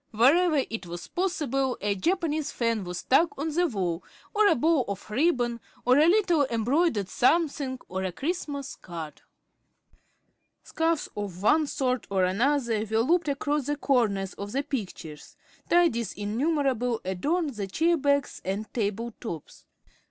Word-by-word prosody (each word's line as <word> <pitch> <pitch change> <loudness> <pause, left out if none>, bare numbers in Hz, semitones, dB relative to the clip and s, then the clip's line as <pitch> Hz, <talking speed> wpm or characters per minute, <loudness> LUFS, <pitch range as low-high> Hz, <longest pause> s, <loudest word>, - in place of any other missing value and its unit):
Wherever 285 +6 +4
it 225 -5 -5
was 175 +1 -7
possible, 285 -8 -1
a 205 0 0
Japanese 315 - -1
fan 230 -3 0
was 180 0 -5
stuck 310 - +2
on 305 +2 -2
the 350 +2 +2
wall, 185 - -2 0.3
or 425 -1 +4
a - - +5
bow 310 +1 +3
of 200 -1 -5
ribbon, 245 -3 +1 0.3
or 255 +3 +5
a 310 - +6
little 345 -7 +3
embroidered 235 - +1
something, 280 - +1
or 190 +1 -3
a 185 - -2
Christmas 285 - -4
card. 165 -4 -8 1.4
Scarfs 325 -1 0
of 200 -3 -5
one 305 +7 +4
sort 260 -3 -1
or 195 -2 +1
another 230 +3 +1
were 220 0 +2
looped 330 +6 +2
across 285 0 -1
the 290 - 0
corners 215 -9 +1
of 200 +2 -7
the 275 +2 0
pictures, 190 - -6 0.3
tidies 330 -11 +3
innumerable 245 +1 0
adorned 290 - 0
the 210 -5 -4
chair 330 - +2
backs 280 -2 0
and 200 +3 -4
table 225 +1 -2
tops. 170 - -8
255 Hz, 145 wpm, -27 LUFS, 205-310 Hz, 1.4 s, a